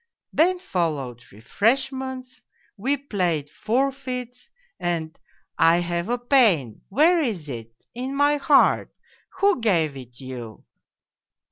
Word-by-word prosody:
Then 360 +4 +3
followed 150 - -3
refreshments, 255 - -2 0.3
we 260 +7 0
played 180 - -2
forfeits, 250 +1 -2 0.3
and 165 -2 -2 0.3
' - - -50
I 165 +1 +6
have 175 +2 -2
a 245 - +1
pain 225 - +2
' - - -43
' - - -49
Where 325 - +4
is 205 - -2
it? 115 -3 -7
' - - -38
' - - -64
In 255 +3 -4
my 290 +1 +3
heart 285 0 +3 0.2
' - - -30
' - - -48
Who 395 -4 +3
gave 165 -10 +2
it 125 -2 -11
you 125 -5 -8
220 Hz, 145 wpm, -24 LUFS, -, 0.3 s, I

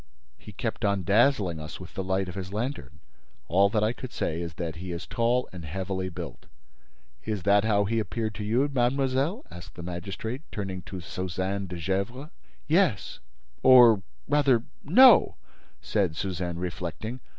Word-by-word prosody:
"He - - -11
kept - - -4
on 100 -2 +1
dazzling 100 - +3
us 75 +1 -8
with 90 - -11
the 95 - -3
light 95 0 -1
of 90 - -6
his 95 -1 -6
lantern. 110 - -4 0.5
All 100 +6 +4
that 105 0 +1
I 110 +2 +1
could 130 0 -8
say 80 +1 -2
is 85 -1 -6
that 85 -2 -4
he 90 +1 -6
is 85 0 -5
tall 120 +2 0
and 90 -2 -8
heavily 95 +3 -3
built." 85 - -8 0.8
"Is 105 -4 -3
that 100 +2 +4
how 105 -2 +2
he 115 +3 0
appeared 110 +1 -3
to 105 - -6
you, 120 +7 +2
mademoiselle?" 135 - 0
asked 90 +1 -11
the 85 - -8
magistrate, 95 - -5
turning 95 -3 -4
to 95 -2 -6
Suzanne 95 +3 -3
de 90 -1 -6
Gesvres. 100 - -3 0.3
"Yes—or, 110 - +3 0.3
rather, 135 -6 +3 0.2
no," 250 - +7 0.5
said 95 -7 0
Suzanne, 90 -1 -3
reflecting. 90 +7 -5
100 Hz, 160 wpm, -27 LUFS, 90-120 Hz, 0.8 s, no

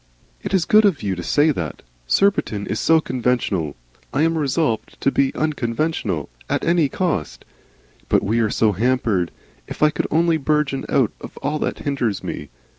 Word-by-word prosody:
"It - - -5
is 185 -3 +2
good 215 +1 +6
of 195 - +2
you 100 -2 0
to 90 - -5
say 145 - +3
that. 85 - -5 0.2
Surbiton 190 - +1
is 110 - -2
so 160 -1 +4
Conventional. 120 - -1 0.4
I 145 - +1
am 165 0 +2
resolved 150 -5 -1
to 140 - +3
be 135 -1 +2
Unconventional 125 - -1 0.2
at - - 0
any 170 -4 +3
cost. 130 - -2 0.6
But - - +3
we 110 +4 +1
are 110 -2 +2
so 110 0 +2
hampered. 110 -4 +1 0.4
If - - -4
I 150 - +5
could - - -2
only 165 +1 +3
burgeon 150 -2 0
out - - +2
of - - -10
all 150 +2 -1
that - - -2
hinders 125 -8 -1
me! 75 - -5
135 Hz, 175 wpm, -21 LUFS, 105-155 Hz, 0.6 s, good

